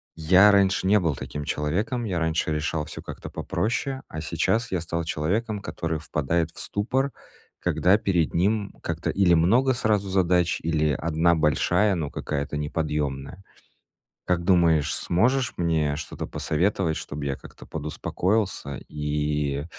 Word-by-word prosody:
я 95 +6 +6
раньше 95 -1 +3
не 105 +1 +5
был 80 -6 0
таким 75 +2 -6
человеком, 100 +12 -1
я 90 -4 -2
раньше 80 -1 0
решал 75 0 -1
всё - - -8
как-то - - -8
попроще, 130 +4 -2
а 80 - -5
сейчас 110 +8 0
я 90 -3 0
стал 85 0 -2
человеком, 105 +8 -1
который 80 -5 -3
впадает 80 +2 -1
в - - -12
ступор, 130 +7 -1 0.5
когда 90 +4 +3
перед 90 -7 0
ним 100 +3 +1
как-то 85 0 -2
или 95 -3 +4
много 120 +11 +4
сразу 105 -4 0
задач, 90 -2 +2
или 80 -2 +1
1 80 +3 +2
большая, 90 +6 +2
но 75 -4 -3
какая-то 75 0 -3
неподъемная. 75 +1 -3 0.9
Как 85 -1 0
думаешь, 85 -5 +3
сможешь 125 +8 +1
мне 80 -4 +1
что-то 80 - -6
посоветовать, 85 0 0
чтобы 75 -1 -5
я 70 -1 -1
как-то - - -14
подуспокоился 80 +1 -2
и, 75 -1 -1
85 Hz, 140 wpm, -25 LUFS, 75-100 Hz, 0.9 s, я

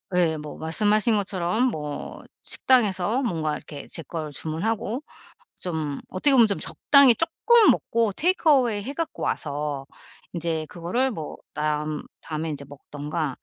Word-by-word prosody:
예, 165 -3 +2
뭐 150 0 -8
말씀하신 210 +7 +2
것처럼 195 +3 0
뭐 150 -7 -6 0.2
식당에서 220 -1 +2
뭔가 160 -9 -1
이렇게 145 -2 -10
제 165 - -6
거를 155 0 -5
주문하고 205 - -2 0.6
좀 155 -5 -3
어떻게 185 +10 +2
보면 235 -4 +7
좀 200 - -1
적당히 280 -4 +5
쪼끔 435 - +5
먹고 230 -2 0
테이크어웨이 275 - +2
해 265 - -5
갖고 330 +1 -4
와서 145 -2 -2 0.5
인제 165 -2 -2
그거를 185 +10 -1
뭐 160 -9 -6 0.2
남 150 0 -2 0.2
다음에 160 0 -4
인제 145 -2 -5
먹든가 145 +1 -5
175 Hz, 295 characters per minute, -25 LUFS, 155-230 Hz, 0.6 s, 보면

